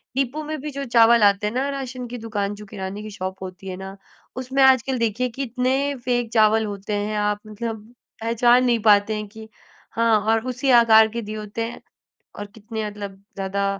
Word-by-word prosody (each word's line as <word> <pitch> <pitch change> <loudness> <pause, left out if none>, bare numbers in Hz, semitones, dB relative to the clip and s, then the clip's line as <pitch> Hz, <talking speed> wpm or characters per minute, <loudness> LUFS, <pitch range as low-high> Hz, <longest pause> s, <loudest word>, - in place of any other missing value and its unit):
Depot 275 +3 -1
में 310 +1 -4
भी 300 - -5
जो 280 - -2
चावल 235 -2 +5
आते 200 0 +3
हैं 210 - -3
ना, 260 +3 0
राशन 260 -3 -5
की 245 +1 -7
दुकान, 205 -3 -3
जो 210 +1 -11
किराने 195 0 -6
की 215 - -7
शॉप 190 +1 -5
होती 185 +1 -9
है 185 - -4
ना, 190 +1 -8 0.4
उसमें 260 +2 -1
आजकल, 265 0 +4
देखिए, 230 +2 0
कितने 255 0 0 0.3
फ़ेक 245 -2 0
चावल 220 0 +4
होते 205 0 -5
हैं। 215 0 -3
आप 210 0 0
मतलब 220 0 -6 0.3
पहचान 240 +2 +3
नहीं 240 -2 +2
पाते 205 +1 +4
हैं 210 0 -5
कि 220 +1 -12 0.4
हाँ 230 -1 +3
और 225 +2 +1
उसी 260 +2 0
आकार 220 -1 +6
के - - -1
दिए 215 - -4
होते 210 +2 -5
हैं, - - -11 0.6
और 205 - -5
कितने 220 +1 -6
मतलब 200 -1 -8 0.2
ज़्यादा, 195 +1 -2
220 Hz, 195 wpm, -22 LUFS, 205-245 Hz, 0.6 s, आकार